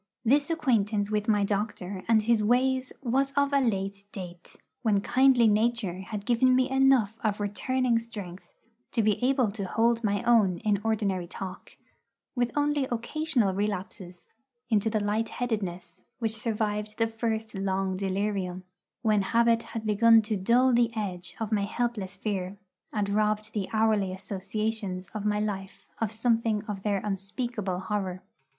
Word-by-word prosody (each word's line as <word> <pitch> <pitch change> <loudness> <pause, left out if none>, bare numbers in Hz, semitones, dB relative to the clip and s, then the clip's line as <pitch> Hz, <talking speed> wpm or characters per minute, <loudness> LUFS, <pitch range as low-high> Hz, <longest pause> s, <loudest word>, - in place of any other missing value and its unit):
This 285 +6 +3
acquaintance 215 -10 +1
with 210 0 0
my 210 -2 +3
doctor 200 -2 -2
and 220 -2 +4
his 225 -1 +2
ways 255 +3 +2
was 270 +3 +1
of 280 0 +1
a 280 - +5
late 195 -4 -1
date, 180 -3 -9 0.3
when 215 -4 +2
kindly 255 0 +4
nature 215 -3 +1
had 205 +1 -6
given 255 +2 +4
me 255 0 +3
enough 265 -6 +4
of 210 -2 0
returning 235 +4 0
strength 205 -6 -9 0.4
to 230 - +2
be 210 +2 +1
able 255 -4 +2
to 200 -1 -4
hold 230 +3 +2
my 205 -2 0
own 220 -7 +4
in 205 -2 +1
ordinary 200 -5 0
talk, 185 +1 -8 0.6
with 245 -2 0
only 290 -2 +1
occasional 240 -3 0
relapses 190 -2 -4 0.5
into 215 0 +3
the 215 0 0
light 210 +2 0
headedness 205 -8 -4 0.2
which 225 -3 -2
survived 215 -1 -2
the 225 - +3
first 225 -1 -3
long 195 -1 -1
delirium, 190 -1 -2 0.4
when 215 -2 +3
habit 230 +3 +3
had 225 -1 -7
begun 225 +1 +5
to 215 0 -1
dull 240 +7 +3
the 235 -1 +3
edge 185 -4 -4
of 225 -1 -3
my 205 -2 +1
helpless 215 -3 -2
fear, 195 -1 -3 0.3
and 210 -2 -1
robbed 215 +1 0
the 200 -3 -2
hourly 215 -3 +2
associations 195 0 -3
of 210 -1 -2
my 210 0 +1
life 195 -2 -4
of 225 -3 -1
something 225 -1 +1
of 210 -2 -5
their 200 -1 0
unspeakable 200 -1 -3
horror. 185 -2 -3
215 Hz, 155 wpm, -28 LUFS, 195-235 Hz, 0.6 s, a